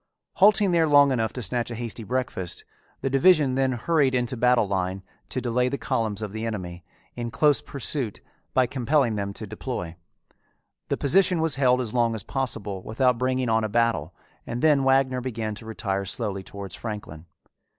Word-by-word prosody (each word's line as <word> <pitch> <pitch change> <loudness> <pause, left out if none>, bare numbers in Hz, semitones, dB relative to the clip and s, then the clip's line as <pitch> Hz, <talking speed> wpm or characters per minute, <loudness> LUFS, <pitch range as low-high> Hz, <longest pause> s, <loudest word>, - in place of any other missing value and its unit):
Halting 200 0 +5
there 165 -2 +3
long 145 -2 +6
enough 115 -3 0
to 125 - -5
snatch 120 +5 -1
a 120 - -5
hasty 115 -1 -5
breakfast, 115 -6 -3 0.4
the 135 - -1
division 145 -1 +4
then 130 0 +1
hurried 135 +1 +1
into 125 0 0
battle 125 -2 +3
line 95 0 -2 0.3
to - - -2
delay 125 0 0
the 140 - -2
columns 110 -4 -2
of 105 - -4
the 110 +1 -5
enemy, 90 -6 -5 0.3
in 120 -1 -4
close 145 +5 +3
pursuit, 135 -4 -3 0.4
by 130 - +5
compelling 130 -1 +1
them 100 -1 -3
to 110 - -7
deploy. 105 -5 -5 0.9
The - - -1
position 180 +4 +3
was 160 -2 +3
held 130 -1 +3
as 115 -4 -3
long 115 -2 +2
as 105 - -5
possible 105 -8 -3
without 125 +4 +1
bringing 130 0 0
on 110 -1 +2
a 110 - -1
battle 110 -8 0 0.3
and 120 +3 -4
then 150 -3 +4
Wagner 135 -1 +2
began 115 -4 -3
to 110 +2 -10
retire 100 -2 -2
slowly 100 -1 -3
towards 100 0 -9
Franklin. 105 -8 -7
120 Hz, 180 wpm, -25 LUFS, 105-135 Hz, 0.9 s, long